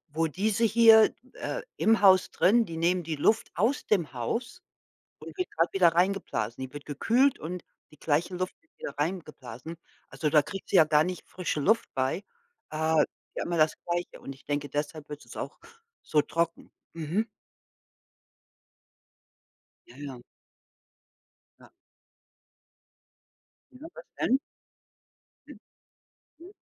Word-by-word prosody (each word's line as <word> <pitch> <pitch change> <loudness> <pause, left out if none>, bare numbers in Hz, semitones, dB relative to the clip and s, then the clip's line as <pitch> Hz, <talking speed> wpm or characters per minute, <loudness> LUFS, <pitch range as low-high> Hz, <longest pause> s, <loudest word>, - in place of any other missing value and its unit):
wo 165 0 +2
diese 200 +7 0
hier, 225 0 +7 0.2
äh, - - -4
im 225 -1 +3
Haus 190 -2 +6
drin, 230 +5 +3
die 165 -4 -7
nehmen 175 +2 +2
die 160 -1 -3
Luft 180 +9 +2
aus 230 +10 0
dem 170 - +1
Haus 235 - -3 0.6
und - - -11
wird 365 - -2
grad 165 +2 0
wieder 185 -3 +6
reingeblasen. 165 - 0
Die 130 - -14
wird 145 -1 -8
gekühlt 245 - +2
und 175 +2 -6 0.3
die 150 - -19
gleiche 165 +4 0
Luft 185 +1 -3
wird 330 - -37
wieder 140 - -6
reingeblasen. 150 -3 -5 0.3
Also, 155 - -2
da 150 0 +6
kriegt 195 +6 -8
sie - - +4
ja 160 - +8
gar 150 0 +4
nicht 180 +1 -5
frische 180 -4 -3
Luft 220 +10 +2
bei. 135 +9 0 0.5
Äh, 160 0 +2 0.3
ja - - -2
immer 170 0 -1
das 155 -1 +4
Gleiche 175 0 -3
und 135 - -7
ich 135 - -21
denke, 145 -1 -2
deshalb 150 +1 -4
wird 150 0 -8
es - - -12
auch - - -6 0.4
so 150 - +2
trocken. 165 +3 -2 0.2
Mhm. 165 +7 -1 2.6
Ja, 120 - -16
ja. 140 -3 -7 1.4
Ja. - - -17 2.0
Ja, 270 +5 -11
was - - -11
denn? 260 - +3 1.1
Mhm. - - -12 0.8
Hm. 350 +4 -13
170 Hz, 140 wpm, -28 LUFS, 150-210 Hz, 2.6 s, ja